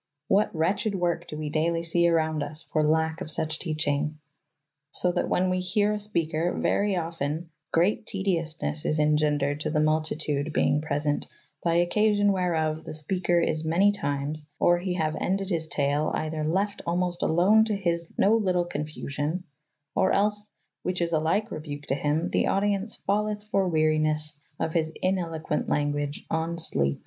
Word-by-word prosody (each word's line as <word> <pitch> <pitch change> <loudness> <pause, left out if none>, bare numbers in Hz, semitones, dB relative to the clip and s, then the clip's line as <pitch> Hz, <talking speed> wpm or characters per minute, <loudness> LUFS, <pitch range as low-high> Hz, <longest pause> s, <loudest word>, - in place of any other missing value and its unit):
What 200 -2 +2
wretched 195 +6 0
work 175 -2 -1
do 150 - -6
we 150 -1 -4
daily 165 +2 +1
see 170 +1 +3
around 160 -2 +1
us 150 +2 -4
for 155 - 0
lack 160 +1 +1
of - - -5
such 160 0 -2
teaching! 150 -2 -1 0.7
So 180 +5 +2
that 175 - -1
when 185 0 +2
we 185 - +1
hear 205 +3 +1
a 210 - -2
speaker, 170 -5 -1
very 200 -1 +1
often 165 -1 -3 0.2
"greate 200 +6 +2
tediosnes 165 - -1
is 155 - +1
engendred 150 -1 +2
to 155 - -2
the 155 0 +1
multytude 155 -1 0
beynge 150 0 +2
present, 145 -1 -1 0.3
by 170 -1 +1
occasyon 205 +2 +3
where 180 -3 0
of 155 0 -1
the - - -6
speker 175 +3 +1
is 160 -2 0
many 175 +6 +4
times 145 -4 -3
or 175 0 +4
he 180 0 -2
haue 155 -3 0
endyd 195 +1 0
his 165 -4 -1
tale 145 +1 0
eyther 155 0 -2
lefte 195 +6 0
almost 175 0 0
alone 190 +7 +5
to 215 -2 -1
hys 170 -3 -1
no 205 +3 +4
lytle 185 -5 +1
confusyon, 150 +1 -3 0.5
or 190 0 +2
els, 210 +1 +1 0.3
which 180 0 -2
is 170 -1 -1
a 160 - +3
13'ke 200 +8 0
rebuke 145 -2 -6
to 135 - -1
hym, 150 +4 0
the - - +2
audyence 200 +2 0
falleth 210 +1 0
for 190 -2 +2
werynes 155 -2 +2 0.2
of 160 - -1
his 160 -2 +1
ineloquent 165 -5 -1
langage 145 0 -1
on 165 +1 -1
slepe. 70 - +1
165 Hz, 170 wpm, -27 LUFS, 155-185 Hz, 0.7 s, alone